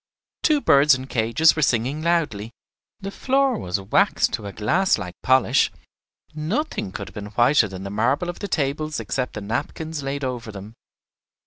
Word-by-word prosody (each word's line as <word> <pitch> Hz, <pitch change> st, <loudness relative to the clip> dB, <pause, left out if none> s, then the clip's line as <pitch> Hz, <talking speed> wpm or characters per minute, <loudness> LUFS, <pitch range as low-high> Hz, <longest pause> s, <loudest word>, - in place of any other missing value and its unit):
Two 300 Hz, -3 st, +3 dB
birds 140 Hz, -, +5 dB
in 130 Hz, 0 st, -6 dB
cages 125 Hz, +6 st, +3 dB
were 155 Hz, -, -1 dB
singing 130 Hz, +3 st, +1 dB
loudly; 155 Hz, -11 st, 0 dB, 0.5 s
the 195 Hz, 0 st, -5 dB
floor 270 Hz, +2 st, +1 dB
was 90 Hz, +2 st, -2 dB
waxed 95 Hz, +1 st, +2 dB
to 105 Hz, -, -4 dB
a -, -, -6 dB
glass 170 Hz, -, +1 dB
like 90 Hz, -1 st, -6 dB
polish; 130 Hz, 0 st, +3 dB, 0.6 s
nothing 160 Hz, -, -3 dB
could -, -, -7 dB
have -, -, -18 dB
been 105 Hz, -1 st, -7 dB
whiter 120 Hz, -1 st, +4 dB
than 95 Hz, -1 st, -8 dB
the 100 Hz, -, -6 dB
marble 130 Hz, -, 0 dB
of 175 Hz, -, -5 dB
the 205 Hz, -, -4 dB
tables 150 Hz, -1 st, -2 dB
except 130 Hz, -2 st, -3 dB
the 105 Hz, -, -5 dB
napkins 145 Hz, +8 st, -4 dB
laid 140 Hz, +1 st, -4 dB
over 125 Hz, -4 st, -4 dB
them. 100 Hz, +2 st, -10 dB
135 Hz, 175 wpm, -23 LUFS, 110-160 Hz, 0.6 s, birds